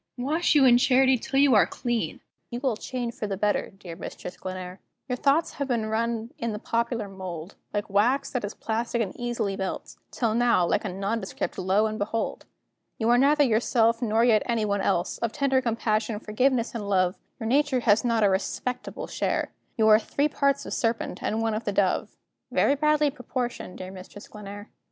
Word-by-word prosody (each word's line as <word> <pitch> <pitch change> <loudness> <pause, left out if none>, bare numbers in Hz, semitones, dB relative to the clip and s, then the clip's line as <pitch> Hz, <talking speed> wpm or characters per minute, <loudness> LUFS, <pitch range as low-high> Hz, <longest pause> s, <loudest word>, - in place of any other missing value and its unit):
wash 305 +7 +1
you 280 -2 +6
in 245 -1 +6
Charity 260 +1 +4
till 265 +3 -3
you 280 -2 +5
are 210 - +5
clean; 240 -2 -3 0.3
You 240 - -4
will 260 -4 0
change 240 +1 -4
for 210 - -4
the 195 -1 -3
better, 205 +1 0
dear 185 -3 -10
Mistress 180 - -8
Glenare. 185 0 -7 0.3
Your 250 - -1
thoughts 280 +5 +2
have 280 - -3
been 235 -4 0
run 230 +1 -2
in 230 -2 -2
the - - -3
popular 230 0 -1
mould, 185 -2 -7 0.2
Like 205 -1 -2
wax 235 +8 +2
that 250 - -2
is 205 - -4
plastic 230 +1 -2
and 205 -5 -2
easily 240 -5 -2
melts; 190 -1 -5
Till 230 -3 -1
now, 235 -6 +3
like 205 - +1
a - - -1
nondescript, 195 +2 -3
lo, 190 +3 +2
and 215 0 -3
behold! 220 +2 -3 0.5
You 225 0 0
are 240 - +5
neither 290 +2 +5
yourself, 230 -1 +2
nor 225 -1 +2
yet 220 -3 +4
any 230 -3 +1
one 205 -1 0
else. 175 -2 0
Of 230 -1 -2
tender 270 -2 +2
compassion, 225 -2 -1
forgiveness, 235 +3 +1
and 210 -4 -4
love, 185 -2 +2 0.2
Your 225 - -5
nature 265 +1 +2
has 215 -2 +4
not 230 -3 +2
a 205 - +5
respectable 240 +6 -3
share; - - -1 0.3
You 220 -1 +4
are 215 0 +8
three 285 +5 0
parts 280 -1 +1
of - - -5
serpent, 230 -1 -1
and 220 +1 -1
one 225 -1 0
of 220 +1 -3
the 205 - 0
dove 195 -2 0 0.3
Very - - +3
badly 300 0 +2
proportioned, 250 -6 -5
dear 185 0 -7
Mistress 190 +2 -11
Glenare. 205 0 -9
225 Hz, 195 wpm, -26 LUFS, 205-250 Hz, 0.5 s, are